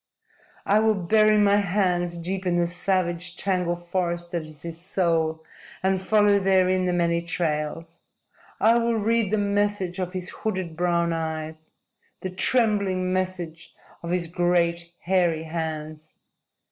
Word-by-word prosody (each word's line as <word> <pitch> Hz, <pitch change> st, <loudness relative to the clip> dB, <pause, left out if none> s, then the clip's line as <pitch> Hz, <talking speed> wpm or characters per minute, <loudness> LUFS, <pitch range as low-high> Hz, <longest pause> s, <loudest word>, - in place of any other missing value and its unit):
"I 205 Hz, +2 st, +4 dB
will 220 Hz, 0 st, +3 dB
bury 215 Hz, +3 st, +3 dB
my 205 Hz, -1 st, +4 dB
hands 180 Hz, -3 st, 0 dB
deep 185 Hz, +2 st, -3 dB
in 175 Hz, -1 st, +1 dB
the 175 Hz, -, +2 dB
savage, 180 Hz, 0 st, -1 dB
tangled 180 Hz, -3 st, -1 dB
forest 175 Hz, -1 st, -2 dB
that 170 Hz, -, -1 dB
is 155 Hz, -2 st, -11 dB
his 165 Hz, 0 st, -7 dB
soul 165 Hz, -4 st, 0 dB, 0.4 s
and 190 Hz, 0 st, +1 dB
follow 205 Hz, 0 st, +3 dB
therein 185 Hz, -1 st, +2 dB
the -, -, +1 dB
many 170 Hz, -1 st, +1 dB
trails. 165 Hz, -1 st, -3 dB, 0.6 s
I 230 Hz, +2 st, +4 dB
will 235 Hz, 0 st, +1 dB
read 225 Hz, -1 st, +1 dB
the 215 Hz, -, +1 dB
message 205 Hz, -2 st, 0 dB
of 180 Hz, 0 st, -3 dB
his 185 Hz, -1 st, -2 dB
hooded, 185 Hz, -6 st, -4 dB
brown 170 Hz, 0 st, +1 dB
eyes, 160 Hz, -1 st, -5 dB, 0.5 s
the 185 Hz, -, -4 dB
trembling 195 Hz, -3 st, +1 dB
message 180 Hz, -3 st, -4 dB, 0.3 s
of 170 Hz, -, -6 dB
his 175 Hz, 0 st, 0 dB
great, 170 Hz, 0 st, 0 dB
hairy 175 Hz, -3 st, +1 dB
hands. 155 Hz, -1 st, -5 dB
180 Hz, 140 wpm, -25 LUFS, 170-195 Hz, 0.6 s, I